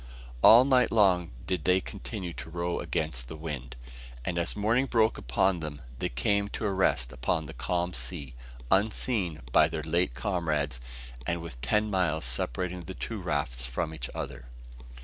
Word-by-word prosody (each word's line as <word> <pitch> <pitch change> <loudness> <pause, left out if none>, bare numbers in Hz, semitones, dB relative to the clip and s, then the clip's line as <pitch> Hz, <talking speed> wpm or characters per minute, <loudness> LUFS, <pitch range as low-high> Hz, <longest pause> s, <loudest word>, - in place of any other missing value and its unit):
All 120 +3 +9
night 130 -2 +4
long 95 -6 +4 0.2
did 95 -1 -1
they 90 0 +4
continue 95 -2 -6
to - - -8
row 85 +1 -2
against 60 -6 -2
the 80 - -7
wind; 70 -5 -6 0.5
and 85 -1 -1
as 85 - -1
morning 115 +6 +2
broke 110 -3 +2
upon 90 +9 +1
them, 75 -2 -5 0.2
they - - 0
came 100 +12 +1
to 110 - -4
a 100 - +1
rest 65 -10 +2
upon 65 -2 -1
the - - -8
calm 90 0 -1
sea, 70 -10 -5 0.4
unseen 100 -3 +1
by - - +6
their 80 -1 -4
late 80 -4 +1
comrades, 75 -5 -1 0.5
and 85 0 0
with 75 -8 -8
ten 105 - +1
miles 85 -6 +1
separating 85 +9 -2
the 95 - -7
two 110 -4 -5
rafts 70 -8 -1
from 75 +6 -2
each 80 - -5
other. 60 -2 -6
85 Hz, 170 wpm, -29 LUFS, 75-95 Hz, 0.5 s, All